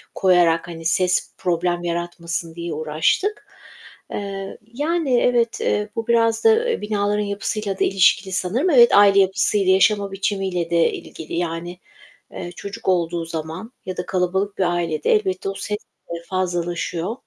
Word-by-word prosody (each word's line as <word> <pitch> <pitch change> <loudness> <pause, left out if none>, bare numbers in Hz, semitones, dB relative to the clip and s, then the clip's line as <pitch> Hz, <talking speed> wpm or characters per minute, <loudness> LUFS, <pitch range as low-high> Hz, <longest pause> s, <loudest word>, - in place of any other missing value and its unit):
koyarak, 175 -3 +3
hani, 165 -1 -8
ses 180 +2 +1
problem 175 -1 -1
yaratmasın 170 -1 -4
diye 170 -1 -4
uğraştık. 155 - 0 0.6
Eee, 195 -1 -5 0.2
yani, 295 -2 +1
evet, 235 -2 +1
eee, 210 0 0
bu 230 -1 -3
biraz 230 -1 +2
da 450 +2 +4
eee 465 - -1
binaların 210 0 0
yapısıyla 200 0 -3
da - - +3
ilişkili 190 0 +3
sanırım. 210 - 0
Evet, 240 -6 +6
aile 200 -1 +7
yapısıyla, 190 0 +3
yaşama 200 +1 +3
biçimiyle 195 -3 -2
de 170 -1 +3
ilgili 160 - -9
yani, 175 +1 -3 0.5
eee, 175 -1 -7
çocuk 200 0 -8
olduğu 170 -2 0
zaman 165 +6 -6
ya 185 -1 -5
da 180 - -3
kalabalık 190 +2 -1
bir 190 - +2
ailede 165 -3 -1
elbette 190 -2 +1
o - - -3
ses 210 +1 -3 0.3
eee, 170 0 -4
fazlalaşıyor. 175 +1 -2
185 Hz, 145 wpm, -21 LUFS, 175-210 Hz, 0.6 s, aile